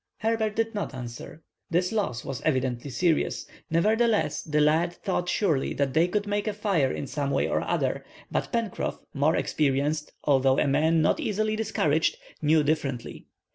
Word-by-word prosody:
Herbert 220 -1 0
did 225 0 0
not 205 -9 -3
answer. 125 +5 -8 0.3
This 180 +2 +1
loss 195 - -2
was 135 -2 -5
evidently 130 -2 -1
serious. 165 +4 0 0.2
Nevertheless, 215 +6 +2
the 150 -2 -1
lad 160 +3 +3
thought 180 -2 -2
surely 160 -11 +1
they 145 +5 +2
could 205 +3 -1
make 205 +1 -1
a 215 - 0
fire 195 -11 +1
in - - -4
some 140 +1 -2
way - - +1
or - - 0
other, - - -1 0.3
but - - -1
Pencroff, 230 -5 -2 0.2
more 145 +3 +2
experienced, 150 +1 0
although 135 -2 +3
a - - +3
man 155 +3 +3
not - - +2
easily 215 +1 0
discouraged, 160 -8 +1 0.2
knew 155 0 +4
differently. 140 -5 -2
160 Hz, 160 wpm, -27 LUFS, 140-205 Hz, 0.3 s, knew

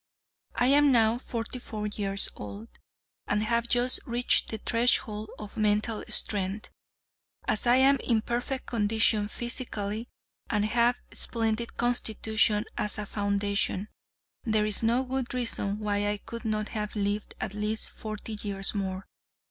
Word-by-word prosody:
I 245 - +2
am 285 +2 +5
now 230 -1 +3
forty 235 0 -5
four 215 -3 -5
years 200 -1 +1
old, 105 +2 -8 0.6
and 210 +1 +1
have 235 +1 0
just 245 +1 +3
reached 240 +1 +2
the 220 - -4
threshold 220 -2 +2
of 210 -1 -9
mental 215 +1 +1
strength. 200 0 0 0.8
As 220 - +2
I 240 - +6
am 270 +2 +5
in 230 -3 0
perfect 245 +3 -2
condition 220 -1 +2
physically, 225 -2 -4 0.4
and 210 -1 +1
have 235 +3 +2
a - - -9
splendid 225 0 -1
constitution 220 -3 +1
as 210 - +1
a 210 - -3
foundation, 200 0 -1 0.5
there 215 -2 +1
is 210 -1 +1
no 235 +3 +2
good 260 -1 -3
reason 220 -5 0
why 205 -1 -1
I 205 0 0
could 230 +3 -9
not 215 -1 -1
have 210 -2 -4
lived 205 0 -2
at - - -4
least 210 +1 -1
forty 215 0 -6
years 195 -2 +3
more. 190 -2 -3
215 Hz, 145 wpm, -28 LUFS, 205-235 Hz, 0.8 s, I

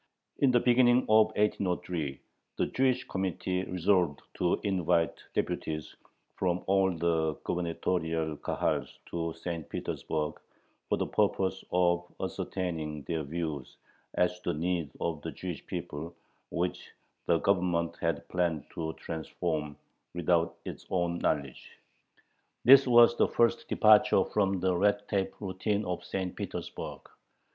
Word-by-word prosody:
In 140 - +5
the 125 -1 +5
beginning 120 0 +5
of 110 0 +7
1803, 90 -8 -1 0.4
the - - +2
"Jewish 130 -1 +1
Committee" 95 0 -2
resolved 90 -4 +1
to 90 -1 +1
invite 90 -4 +1
deputies 75 -1 -2 0.4
from 90 -1 0
all 95 0 +3
the 80 -2 0
gubernatorial 80 -2 -1
Kahals - - -2
to 85 -1 -2
St. 80 -1 -5
Petersburg 75 -1 -3 0.5
for - - +2
the - - 0
purpose 95 0 0
of 85 -1 +2
ascertaining 80 -5 -3
their 80 +1 -2
views 75 -2 -4 0.4
as 90 0 +1
to 90 - -2
the - - -5
needs 85 -3 -1
of 80 -3 -2
the - - -5
Jewish 90 -3 -6
people, 85 -2 -5 0.3
which 90 +1 -2 0.4
the 85 - +4
Government 85 -3 +1
had 85 -3 -2
planned 85 -5 0
to 80 -1 -3
"transform" 80 -2 -4 0.4
without 85 0 +1
its - - -8
own 85 -2 0
knowledge. 70 -3 -2 0.9
This 135 +1 +9
was 120 -1 +7
the - - +3
first 115 0 +2
departure 105 -3 +6
from 95 -3 0
the 95 -1 +2
red 100 +2 +2
tape 95 -2 -1
routine 100 +2 -1
of 90 -1 -3
St. 90 0 -3
Petersburg. - - -6
90 Hz, 130 wpm, -30 LUFS, 80-95 Hz, 0.9 s, This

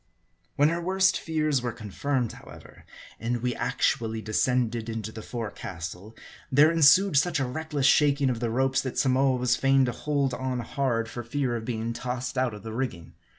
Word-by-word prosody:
When 145 +2 +4
her 170 +1 -2
worst 190 +2 +2
fears 155 -4 0
were 120 -1 -2
confirmed, 120 +3 -2
however, - - -14 0.3
and 120 +1 -2
we 125 -1 0
actually 115 -1 -1
descended 115 +1 0
into 110 -1 -4
the 110 - -8
forecastle; 100 -3 -7 0.4
there 145 +4 +6
ensued 165 +3 +5
such 165 +2 +2
a 135 - 0
reckless 150 +1 -3
shaking 140 -1 +4
of 120 - -3
the 120 -1 -1
ropes, 130 +3 +1
that 130 - -5
Samoa 130 -1 +3
was 125 0 +1
fain 135 0 +3
to 125 - -1
hold 140 +1 -1
on 130 -1 -2
hard, 120 -2 -1
for 120 - -6
fear 125 0 -1
of 115 -1 -5
being 115 -1 -3
tossed 125 +1 -4
out 130 -4 0
of 105 - -11
the 110 -1 -6
rigging. 110 -9 -4
125 Hz, 180 wpm, -27 LUFS, 115-140 Hz, 0.4 s, there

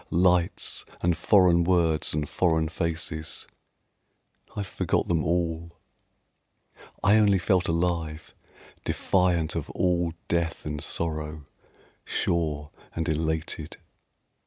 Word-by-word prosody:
Lights 90 0 +2 0.2
and 85 -1 +2
foreign 90 -4 +4
words 85 -3 +2
and 75 -1 -1
foreign 80 -2 +1
faces, 80 -2 -3 1.1
I 105 - -2
forgot 95 - -1
them 80 -3 +1
all; 85 0 -1 1.3
I 100 +3 +6
only 105 -2 +5
felt 90 0 +1
alive, 85 -2 -1 0.5
defiant 90 -4 +1
of - - -4
all 85 -2 0
death 85 -1 -1
and 75 -1 -4
sorrow, 75 -2 -2 0.6
Sure 75 -4 -1 0.2
and 80 -1 -2
elated. 80 0 -2
85 Hz, 100 wpm, -26 LUFS, 80-90 Hz, 1.3 s, I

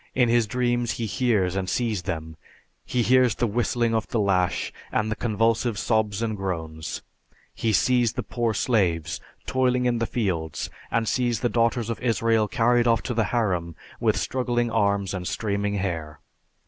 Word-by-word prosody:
In 125 -2 +3
his 115 -1 +3
dreams 120 0 0
he 115 - -3
hears 105 -6 +1
and 95 -1 -2
sees 115 -6 0
them. 80 -3 -5 0.5
He 125 -1 0
hears 125 -1 +4
the - - 0
whistling 120 +1 0
of 110 -1 0
the 115 - -1
lash 95 -3 +1 0.2
and 110 +1 0
the - - 0
convulsive 115 0 +1
sobs 110 -1 0
and 110 -2 -1
groans. 80 -5 -4 0.5
He 115 - 0
sees 120 +1 +3
the - - -3
poor 115 -3 -1
slaves 85 - +1 0.2
toiling 125 -1 +1
in 120 -1 +1
the 115 - 0
fields 85 -9 -2 0.2
and 115 -1 0
sees 120 -3 0
the 120 - +1
daughters 115 -1 +1
of 110 - -5
Israel 115 -2 +2
carried 120 +2 +2
off 115 -2 +3
to 125 - -2
the 115 -2 +1
harem 90 -9 -1 0.2
with - - +2
struggling 120 -2 0
arms 100 -3 +1
and 90 -1 -4
streaming 100 -1 -1
hair. 80 -6 -3
115 Hz, 170 wpm, -25 LUFS, 95-120 Hz, 0.5 s, hears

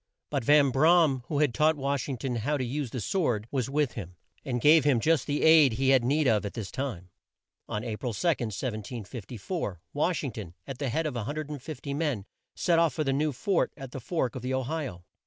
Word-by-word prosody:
But 140 -4 0
Van 145 +1 +5
Bra 165 +6 +5
am, 135 -4 +1
who 150 - -2
had 145 -4 +2
taught 155 +3 +3
Wash 140 0 -1
ing 135 - -2
ton 125 0 -2
how 145 +7 0
to 130 - -2
use 135 +2 -3
the 125 - -4
sword, 120 - 0
was 130 -2 -1
with 145 -2 +1
him, 90 -5 -8 0.3
and 125 -2 -2
gave 155 +5 +6
him 140 -5 +3
just 155 +1 +2
the 145 0 0
aid 160 -6 +7
he 130 +3 +1
had 135 -2 +5
need 145 +4 +2
of 110 -3 +3
at 100 - -5
this 110 -5 -5
time. 110 -10 -5 0.6
On 105 - -3
A 110 -3 -4
pril 115 -5 -4
2, 165 -8 +1
1754, 110 - -5
Wash 160 +4 0
ing 135 - -2
ton, 100 -6 -8
at 135 -1 -7
the 140 -3 -1
head 160 +7 -1
of 150 - -2
150 145 +3 -5
men, 140 -9 -1 0.3
set 170 -2 +2
off 165 -2 +2
for 155 - 0
the 135 -2 0
new 150 +2 +1
fort 175 +8 0
at 135 -3 -8
the 135 - -6
Fork 130 -2 -1
of 130 - -5
the 130 +2 -1
O 130 - 0
hi 155 +2 -2
o. 90 -7 -10
135 Hz, 230 wpm, -28 LUFS, 120-150 Hz, 0.6 s, aid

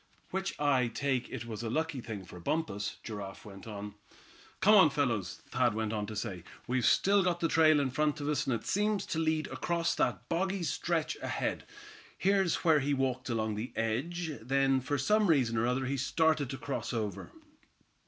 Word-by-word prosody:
"Which 190 +1 -3
I 135 -4 +3
take 130 +1 -1
it - - -6
was 110 -2 -6
a 115 - -3
lucky 155 +1 -1
thing 105 -5 -6
for 90 - -11
Bumpus," 105 - -2
Giraffe 100 -4 -7
went 100 0 -11
on. 105 -1 -6 0.7
"Come 205 +3 +5
on, 190 -7 +8
fellows," 115 -10 -1
Thad - - +2
went 110 0 -1
on 105 -1 -2
to 110 - -6
say, 100 -5 -4 0.2
"we've 125 -1 +1
still 200 +1 +4
got 175 -2 +1
the 165 - +2
trail 155 -2 +5
in 135 -2 0
front 150 +2 0
of 145 - -3
us, 150 -2 0
and 130 - +2
it 110 - -6
seems 210 0 +1
to 160 - -2
lead 160 -1 +1
across 170 0 0
that - - -1
boggy 190 +2 -1
stretch 160 -1 -1
ahead. - - -2 0.5
Here's 195 -2 +2
where 160 -3 +5
he 140 +1 0
walked 130 -1 -1
along 110 -2 0
the 110 +4 -5
edge. 155 +10 -2
Then 135 +2 +2
for 145 +3 -1
some 210 +6 +3
reason 130 -8 +3
or 115 +1 +1
other 130 +1 0
he 135 +2 -1
started 155 +1 +1
to 135 - -4
cross 140 -2 -4
over." 105 -4 -3
135 Hz, 195 wpm, -31 LUFS, 115-160 Hz, 0.7 s, on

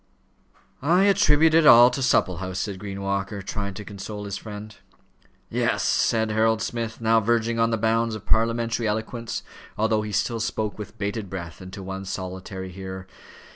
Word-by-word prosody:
"I 170 +7 +4
attribute 160 -6 +4
it 160 -2 +6
all 120 0 +9
to 135 - -3
Supplehouse," 95 -6 +1
said 100 -2 -3
Green 100 -1 -6
Walker, 100 +1 -2
trying 100 0 -4
to 105 - -7
console 105 +1 -7
his 100 -1 -4
friend. 105 0 -8 0.7
"Yes," - - 0
said 110 -1 +2
Harold 110 0 +2
Smith, 115 -1 -4
now 115 0 +4
verging 115 +1 +1
on 115 0 +3
the 115 - 0
bounds 115 +1 +1
of 110 -1 -9
parliamentary 115 +1 +1
eloquence, 110 +2 -3 0.3
although 110 0 +2
he 105 0 -5
still 115 +3 0
spoke 110 -1 -2
with 105 -1 -8
bated 100 0 -3
breath, 85 -3 -7
and 90 0 -9
to 100 -1 -7
one 95 +1 -6
solitary 95 0 -6
hearer. 95 0 -7
110 Hz, 170 wpm, -24 LUFS, 100-115 Hz, 0.7 s, all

